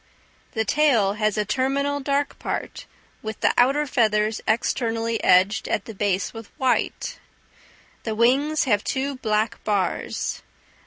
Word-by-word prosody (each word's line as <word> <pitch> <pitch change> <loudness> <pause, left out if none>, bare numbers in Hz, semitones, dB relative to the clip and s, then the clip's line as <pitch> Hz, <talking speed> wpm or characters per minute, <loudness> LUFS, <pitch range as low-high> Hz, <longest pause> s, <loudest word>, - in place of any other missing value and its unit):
The 220 0 0
tail 235 -7 +3
has 215 0 0
a 210 - +1
terminal 275 +5 0
dark 280 +1 -1
bar, - - -3 0.5
with 220 0 -6
the - - +3
outer 275 +5 +3
feathers 220 -5 +1
externally 225 0 0
edged 185 +3 +4
at - - -1
the 225 - -8
base 200 -1 -1
with 225 -2 -9
white. 260 -1 -1 0.8
The 220 -1 -3
wings 275 +7 +3
have 210 -5 +1
two 275 0 -2
black 215 -1 -1
bars. 200 -4 -1
225 Hz, 135 wpm, -23 LUFS, 210-270 Hz, 0.8 s, edged